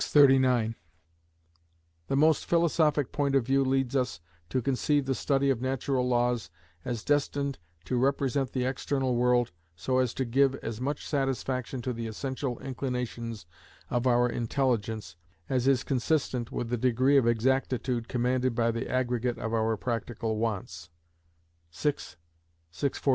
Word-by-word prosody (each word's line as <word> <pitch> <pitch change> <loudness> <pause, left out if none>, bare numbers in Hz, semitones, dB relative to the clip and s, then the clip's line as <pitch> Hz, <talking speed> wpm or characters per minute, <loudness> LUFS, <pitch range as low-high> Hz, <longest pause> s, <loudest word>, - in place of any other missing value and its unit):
639). 130 -5 +4 1.3
"The 135 - 0
most 155 +1 +3
philosophic 160 -4 +2
point 140 -1 0
of 135 -4 +3
view 135 +2 +3
leads 135 0 0
us 125 -12 0 0.3
to 130 - 0
conceive 135 +3 +1
the 135 - 0
study 135 +1 +1
of 125 -3 -1
natural 130 0 0
laws 120 -5 +1 0.3
as 120 -3 -4
destined 140 -1 0 0.3
to 125 - -1
represent 135 0 +1
the 125 -1 -1
external 130 -1 -1
world 120 0 +2 0.2
so 130 +10 0
as 125 -2 0
to 130 - -1
give 135 +3 +3
as 115 -3 -6
much 140 +2 -2
satisfaction 130 -3 -2
to 125 - -2
the 115 -1 -4
essential 130 +2 -3
inclinations 125 - -4 0.5
of 120 +1 +1
our 120 0 +4
intelligence, 115 - -1 0.3
as 130 -1 0
is 135 -2 +3
consistent 130 -3 0
with 120 - -3
the 120 - 0
degree 130 +3 +3
of 125 -4 +3
exactitude 125 0 0
commanded 125 0 0
by 115 0 +2
the 115 +2 -4
aggregate 125 -1 0
of 115 - -4
our 110 -1 +1
practical 115 -1 -3
wants" 95 -7 -3 0.8
(vi. 115 - 0 0.8
642). 140 - -2
125 Hz, 145 wpm, -28 LUFS, 120-135 Hz, 1.3 s, 639